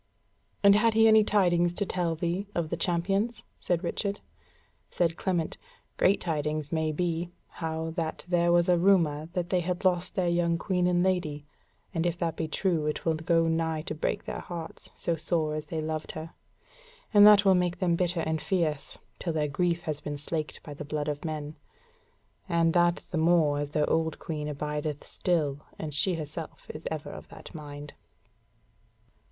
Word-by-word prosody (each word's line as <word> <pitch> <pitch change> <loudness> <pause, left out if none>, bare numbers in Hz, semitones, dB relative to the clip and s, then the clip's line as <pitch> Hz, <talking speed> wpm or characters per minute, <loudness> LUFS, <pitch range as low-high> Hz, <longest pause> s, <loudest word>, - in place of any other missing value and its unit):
"And 200 0 +8
had 220 +2 +3
he 225 0 +6
any 220 -1 +7
tidings 175 -4 +2
to 205 - +1
tell 175 -3 -1
thee 175 +4 -2
of 170 -2 -1
the - - +1
champions?" 195 +7 0 0.2
said 175 0 -1
Richard. 200 +3 -2 0.7
Said 165 -2 +1
Clement, 175 -3 -1 0.4
"Great 195 - +4
tidings 155 -2 -2
maybe, 165 +2 -1 0.3
how 160 0 -2
that 160 -1 -4
there 175 -1 +3
was 175 0 +4
a 175 -1 +4
rumour 165 -5 +3
that 180 -1 -2
they 185 - +3
had 180 +2 -3
lost 180 -1 +1
their 185 -2 +1
young 170 -1 +2
Queen 180 0 0
and 175 0 +3
Lady; 160 -6 0 0.5
and 165 +1 +1
if 170 0 -1
that 165 -2 -1
be 160 - -2
true, 160 -1 0
it 150 - -3
will 165 - +3
go 165 +1 +2
nigh 160 -1 0
to 155 - -4
break 155 - -2
their - - -5
hearts, 165 -2 -7
so 170 - 0
sore 160 -1 0
as 155 0 -4
they 160 -1 -3
loved 155 0 -4
her. 160 +1 -7 0.8
And 205 -1 +8
that 205 -1 +7
will 190 - +7
make 180 -1 +1
them 175 -3 +2
bitter 175 -1 0
and 160 0 -1
fierce, 160 -6 -1 0.2
till 170 - -2
their 150 -1 +1
grief 170 +4 0
has 150 -2 -3
been 145 0 -4
slaked 155 +1 -4
by 150 - -8
the 145 - -7
blood 150 0 -2
of 145 -1 -4
men. 155 -1 -4 0.9
And 165 -1 +3
that 175 -1 +3
the 165 - 0
more 160 -3 +3
as 145 0 -2
their 150 0 +1
old 160 -1 +1
Queen 150 -2 -4
abideth 150 0 -3
still, 150 -6 0 0.2
and 155 -2 -5
she 175 +5 +1
herself 155 0 -7
is 155 - -7
ever 155 -1 -5
of - - -10
that - - -12
mind." 145 -2 -8
165 Hz, 180 wpm, -28 LUFS, 155-175 Hz, 0.9 s, And